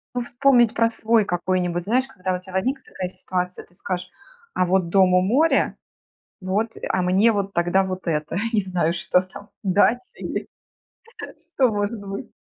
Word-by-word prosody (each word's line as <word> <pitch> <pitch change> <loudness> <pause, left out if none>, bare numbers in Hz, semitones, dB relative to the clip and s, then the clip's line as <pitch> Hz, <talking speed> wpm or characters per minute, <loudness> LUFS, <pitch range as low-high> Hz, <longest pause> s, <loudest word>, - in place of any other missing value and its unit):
Ну, 245 - 0
вспомнить 240 -1 +3
про 230 0 +2
свой 225 -1 +2
какой-нибудь, 175 -1 -1
знаешь, 250 +7 +1
когда 185 -5 -3
у 180 - -2
тебя 185 0 -13
возникнет 260 +9 -1 0.3
ситуация, 180 -1 -4
ты 175 - -21
скажешь: 180 -1 -4 0.4
"А 185 - +2
вот 180 -1 +1
дом 185 0 +4
у 180 - +5
моря, 265 - +2 0.7
вот, 200 +4 -1 0.2
а 185 - +1
мне 190 +5 +4
вот 200 -2 -1
тогда 175 +2 +2
вот 185 0 -5
это, 155 0 -2 0.2
не 210 - +3
знаю, 175 -3 0
что 180 - +2
там, 185 +2 -12
дача, 205 +5 +3
или - - -5 0.9
что 260 -2 0
может 210 +1 -2
быть". 195 - -6
190 Hz, 165 wpm, -23 LUFS, 180-225 Hz, 0.9 s, у